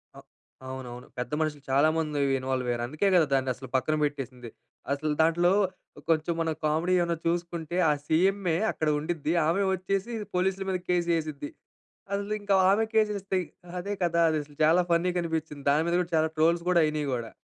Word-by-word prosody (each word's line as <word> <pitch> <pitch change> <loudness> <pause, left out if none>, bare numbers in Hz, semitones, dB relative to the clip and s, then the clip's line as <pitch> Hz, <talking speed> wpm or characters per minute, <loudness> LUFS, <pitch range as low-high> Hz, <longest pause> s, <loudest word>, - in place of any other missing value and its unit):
అహ్, - - -13 0.4
అవునవును. 125 -2 -8
పెద్ద 125 +2 -4
మనుషులు 150 -3 -2
చాలామంది 150 +1 +2 0.2
ఇన్వాల్వ్ 130 -1 -2
అయ్యారు. 120 -1 -1
అందుకే 155 +9 0
కదా 170 - +5
దాన్నసలు 130 -1 -1
పక్కన 155 +4 +1
పెట్టేసింది. 130 -5 -4 0.4
అసలు 150 +2 -1
దాంట్లో 175 +2 +3 0.6
కొంచెం 160 +1 +2
మనం 160 -1 0
కామెడీ 160 +4 +1
ఏమన్నా 170 -1 0
చూసుకుంటే 170 -1 -2
ఆ - - +5
సీఎంఏ 180 +1 +2
అక్కడ 155 - -1
ఉండిద్ది, 160 0 -2
ఆమె 185 +5 +2
వచ్చేసి 195 +4 -2 0.2
పోలీసుల 190 +1 0
మీద 185 -1 0
కేస్ 175 -1 +1
ఏసిద్ది. 150 -2 -5 0.6
అసలు 200 +1 -2
ఇంకా 200 -1 +2 0.2
ఆమె 215 +3 +3
కేసేస్తే 205 -3 +1 0.4
అదే 200 +3 -3
కదా! 170 -1 +1
అదసలు 150 -2 -3
చాలా 165 +4 +5
ఫన్నీగా 175 +1 +2
అనిపించింది. 160 -3 -4
దాని 155 +3 +2
మీద 170 - +1
కూడా 175 - -6
చాలా 160 0 +2
ట్రోల్స్ 170 +2 +3
కూడా 170 -2 +5
అయినాయి 150 -2 -2
గూడా. 115 -2 -4
160 Hz, 160 wpm, -27 LUFS, 145-180 Hz, 0.6 s, కదా